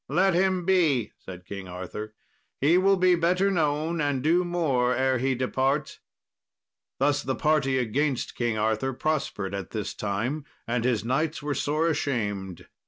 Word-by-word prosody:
"Let 185 +6 +3
him 185 0 +1
be," 160 - +2
said 90 -1 -10
King 100 -1 -7
Arthur; 95 +4 -7 0.4
"he 150 +5 +4
will 195 +2 +4
be 185 0 +4
better 180 +3 +2
known, 160 -1 0
and 145 -3 0
do 170 +4 +3
more 140 -8 +1
ere 130 0 +1
he 130 +1 +1
depart." 135 +3 -1 1.0
Thus 145 +1 +2
the 130 -1 -2
party 150 -4 +2
against 130 +3 -1
King 120 -2 -1
Arthur 110 +5 0
prospered 125 -9 -2
at 100 -1 -4
this 110 -2 -4
time, 115 +9 -2 0.2
and 120 0 -1
his 120 -3 +1
knights 150 +5 -1
were 145 0 -1
sore 155 +4 0
ashamed. 105 - -2
135 Hz, 155 wpm, -26 LUFS, 115-160 Hz, 1.0 s, he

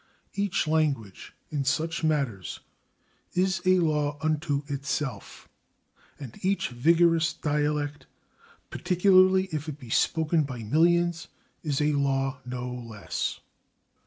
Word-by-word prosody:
" - - -42
Each 200 -4 0
language, 145 -11 -1 0.2
in 145 -2 -1
such 155 +6 -1
matters, 140 - -1 0.8
is 185 0 +1
a 185 0 +6
law 150 -4 +1
unto 155 -1 -1
itself, 140 -1 -4 0.7
and 135 -6 -10
each 195 +1 0
vigorous 165 +5 +3
dialect, 145 -2 -2 0.6
particularly 185 +1 +4
if 155 0 -3
it 145 - -6
be 125 -6 -11
spoken 160 +3 +2
by 130 -5 -5
millions, 170 +6 +2 0.3
is 145 -4 -1
a 150 0 +2
[Pg320] 140 - +1
law 135 -1 0
no 125 0 -4
less. 115 -4 -4
150 Hz, 120 wpm, -27 LUFS, 135-165 Hz, 0.8 s, a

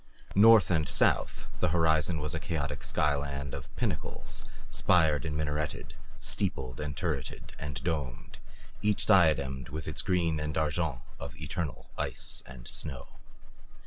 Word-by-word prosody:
North 110 0 +7
and 80 -3 +2
south, - - +2
the - - +3
horizon 80 0 +3
was 75 0 -2
a 80 - -1
chaotic 75 -3 -3
sky 75 -1 +2
land 70 -1 -3
of 65 -3 -6
pinnacles, - - -3 0.3
spired 80 -4 +3
and 75 -1 -2
minareted, 75 -1 -2 0.2
steepled 65 -2 -1
and 75 -1 -4
turreted 75 -6 -3
and 70 -2 -5
domed, 70 -8 -3 0.4
each 105 -1 +2
diademed 75 - +4
with 75 +3 -5
its - - -1
green 85 -4 +1
and 75 0 -2
argent 75 -4 0 0.2
of 70 +2 -7
eternal 75 -1 -4
ice - - -1
and - - -10
snow. 70 -5 -4
75 Hz, 140 wpm, -30 LUFS, 70-80 Hz, 0.4 s, North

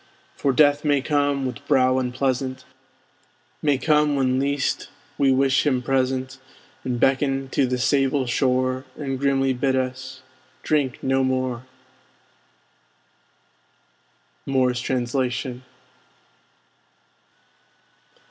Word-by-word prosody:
For 140 - +1
Death 145 +2 +4
may 145 -2 +2
come, 145 -1 0
with 130 +2 -5
brow 130 -2 +3
unpleasant, 130 +1 -2 1.0
May 145 -3 +2
come 150 0 +2
when 130 -1 +1
least 140 0 -1 0.3
we 140 -1 +4
wish 135 0 +3
him 130 -3 +1
present, 130 0 -1 0.4
And 125 -2 -2
beckon 135 0 +1
to 135 -1 +1
the 125 0 -1
sable 135 +1 +1
shore, 130 +1 0
And 135 -3 -4
grimly 135 -1 +1
bid 130 +1 0
us 130 0 -4 0.4
drink 140 -5 0
no 135 0 +2
more! 130 -1 -2 2.8
Moore's 130 -2 +1
Translation. 125 0 -2
130 Hz, 100 wpm, -23 LUFS, 130-140 Hz, 2.8 s, Death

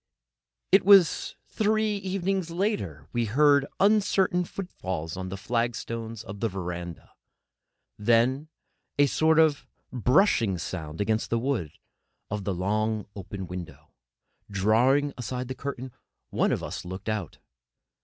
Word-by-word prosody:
It 195 - +6
was 195 -4 +5
three 215 -1 +1
evenings 190 -2 -2
later 170 - -2
that - - -23
we 120 -1 +1
heard 140 +4 +4
uncertain 195 -3 +3
footfalls 95 - -5
on 95 0 -5
the 95 - -5
flagstones 115 0 -3
of 100 -2 -8
the 115 - 0
verandah, 85 -3 -6 0.9
then 120 +7 +2 0.5
a 145 - +6
sort 160 +3 +2
of 155 -3 +3 0.3
brushing 125 - +3
sound 80 -1 -5
against 110 +2 0
the 115 - +1
wood 115 - -2 0.6
of 100 -1 -3
the 100 - 0
long, 105 +3 0
open 100 0 -6
window. 80 -5 -9 0.6
Drawing 120 +9 +3
aside 125 +1 -4
the - - -2
curtain, 130 -1 -6 0.4
one - - +2
of - - -1
us 90 - -5
looked 95 +3 -8
out. 105 -6 -3
115 Hz, 130 wpm, -27 LUFS, 95-155 Hz, 0.9 s, It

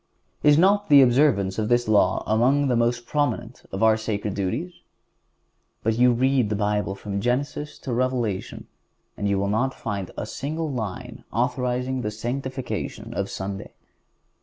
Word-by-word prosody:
Is 150 0 +5
not 200 +3 +3
the 140 -2 +9
observance 120 -7 +3
of 110 0 -1
this 120 -1 +2
law 100 -4 +3
among 130 +6 +2
the 125 - +2
most 120 0 +1
prominent 130 -4 -2
of 95 - -2
our 110 -1 +5
sacred 105 -2 -3
duties? 115 - -2 1.1
But 110 +1 0
you 125 0 +6
may 120 0 0
read 130 -4 +3
the 105 - 0
Bible 105 -1 0
from 100 0 -4
Genesis 140 +5 -2
to 130 - -5
Revelation, 120 -5 -2 0.5
and 100 - -2
you 100 - +2
will 100 +1 0
not 120 +6 0
find 100 -5 -4
a - - -3
single 155 +7 -4
line 110 -7 -5
authorizing 125 +2 -1
the 105 - -2
sanctification 120 -1 -4
of 100 -2 -2
Sunday. 100 +1 -6
120 Hz, 160 wpm, -24 LUFS, 105-130 Hz, 1.1 s, the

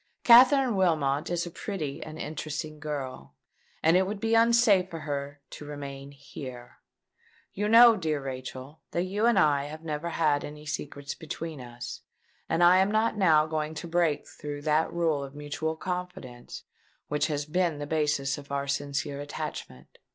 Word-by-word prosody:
Katherine 255 0 +7
Wilmot 155 -6 +1
is 175 0 -1
a 175 - -7
pretty 160 -7 -5
and 155 0 -8
interesting 155 0 -5
girl; 145 -4 -6 0.5
and 160 +2 +5
it 185 +1 +3
would 205 0 -4
be 225 +1 0
unsafe 230 -5 +4
for 165 -3 -7
her 145 -1 -5
to - - -9
remain 140 -1 -7
here. 130 -3 -10 0.7
You 210 +2 -1
know, 230 +1 +8
dear 160 -6 -1
Rachel, 130 +2 -7
that 175 - +1
you 205 +5 0
and 235 -4 +3
I 145 -5 +3
have 155 +2 -8
never 155 +1 -3
had 150 -3 +1
any 150 +1 -9
secrets 145 -1 -5
between 160 -2 -7
us; 120 0 -8 0.5
and 165 +2 +2
I 175 +1 +7
am 190 +1 +3
not 220 +1 +1
now 160 -7 +4
going 155 0 -3
to 170 - -6
break 165 -3 +1
through 145 -1 -7
that 155 +1 +2
rule 165 -4 0
of 140 +1 -9
mutual 150 +2 -3
confidence 180 -8 -6 0.4
which 150 +1 0
has 145 -2 -2
been 170 0 0
the 145 - -4
basis 145 -3 0
of 140 0 -13
our 140 0 -2
sincere 140 0 -2
attachment. 65 - -7
155 Hz, 165 wpm, -28 LUFS, 145-180 Hz, 0.7 s, know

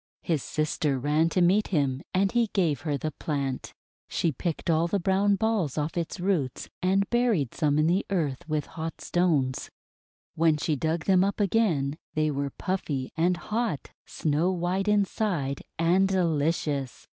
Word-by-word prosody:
His 160 -5 0
sister 155 -2 -1
ran 150 +5 +2
to 180 +1 +2
meet 195 +5 +3
him, 140 -6 0
and 195 +1 +2
he 240 -1 +2
gave 165 -8 +1
her 145 -2 -1
the 155 +3 -3
plant. 140 -5 -3 0.4
She 165 - 0
picked 160 +4 -4
all 165 0 +3
the 200 +3 0
brown 195 +3 +2
balls 210 - 0
off 150 +1 -1
its 170 0 -3
roots, 175 -9 -1
and 195 +2 +2
buried 230 - +2
some 150 -3 +1
in 155 - +3
the 175 +4 +2
earth 160 -6 -2
with 155 -1 0
hot 160 0 -6
stones. 155 -8 0 0.7
WTien 155 -2 +2
she 155 - +1
dug 160 +3 -1
them 190 -1 +4
up 200 +2 -1
again, 175 -9 +1 0.2
they 155 0 +2
were 140 0 -2
puffy 145 -7 -3
and 175 +2 +2
hot, 215 - -2 0.2
snow 155 +4 0
white 185 +2 -1
inside, 195 -8 0 0.2
and 175 +4 +3
delicious! 155 -6 0
165 Hz, 160 wpm, -27 LUFS, 150-190 Hz, 0.7 s, them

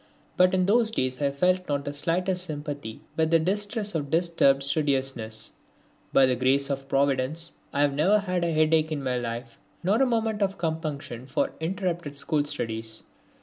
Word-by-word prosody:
But 185 +1 +4
in 185 -1 +2
those 225 +3 +3
days 130 - -1
I 140 - +2
felt 180 +5 +1
not 140 0 -1
the 145 - -3
slightest 180 +4 0
sympathy 145 -6 -6
with 160 0 +2
the 165 - +5
distress 205 +5 -1
of 145 -4 -2
disturbed 160 -4 +3
studiousness. 135 -6 -1 0.6
By 135 - +6
the 130 -1 +2
grace 135 +3 +2
of 135 0 -4
Providence 140 +4 +1 0.2
I 140 - 0
have 145 -1 +3
never 180 +9 +4
had 185 -4 -1
a 170 - +1
headache 155 0 +3
in 145 -3 -2
my 125 -1 0
life, 115 0 -6 0.2
nor 205 +7 +2
a 270 - +4
moment 225 -3 0
of 195 -1 0
compunction 155 -7 -4
for 130 - 0
interrupted 170 -3 -3
school 150 0 +1
studies. 115 -6 -4
155 Hz, 175 wpm, -26 LUFS, 135-180 Hz, 0.6 s, By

